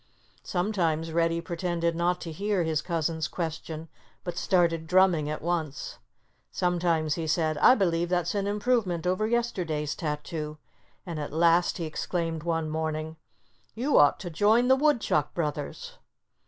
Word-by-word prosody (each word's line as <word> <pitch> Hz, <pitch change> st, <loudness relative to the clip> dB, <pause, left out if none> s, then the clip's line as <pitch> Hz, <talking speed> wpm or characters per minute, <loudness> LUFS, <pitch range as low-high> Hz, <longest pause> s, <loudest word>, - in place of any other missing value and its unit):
Sometimes 170 Hz, -4 st, -1 dB
Reddy 165 Hz, 0 st, +1 dB
pretended 170 Hz, 0 st, -2 dB
not 175 Hz, +1 st, +1 dB
to 165 Hz, -, -5 dB
hear 200 Hz, +2 st, 0 dB
his 160 Hz, -2 st, 0 dB
cousin's 165 Hz, -2 st, -1 dB
question, 160 Hz, -1 st, -5 dB, 0.4 s
but 175 Hz, -, -4 dB
started 170 Hz, -3 st, +1 dB
drumming 180 Hz, -4 st, +3 dB
at 150 Hz, -, -4 dB
once. 160 Hz, -5 st, -3 dB, 0.5 s
Sometimes 170 Hz, -3 st, +1 dB
he 165 Hz, 0 st, -3 dB
said, 155 Hz, 0 st, +1 dB
"I 250 Hz, -, +7 dB
believe 175 Hz, -4 st, +1 dB
that's 175 Hz, -1 st, 0 dB
an 200 Hz, -1 st, -1 dB
improvement 205 Hz, -5 st, 0 dB
over 185 Hz, +4 st, +1 dB
yesterday's 180 Hz, -11 st, -1 dB
tattoo." 150 Hz, 0 st, -4 dB, 0.5 s
And 170 Hz, -4 st, -5 dB
at 145 Hz, -, -4 dB
last 170 Hz, +2 st, +3 dB
he 170 Hz, -, -3 dB
exclaimed 165 Hz, 0 st, -3 dB
one 165 Hz, -1 st, -1 dB
morning, 155 Hz, 0 st, -3 dB, 0.6 s
"You 265 Hz, +6 st, +3 dB
ought 145 Hz, -1 st, +5 dB
to 175 Hz, -4 st, -6 dB
join 220 Hz, +8 st, +3 dB
the 265 Hz, -, +7 dB
Woodchuck 265 Hz, -, +1 dB
brothers!" 170 Hz, -, -4 dB
170 Hz, 140 wpm, -27 LUFS, 160-185 Hz, 0.6 s, I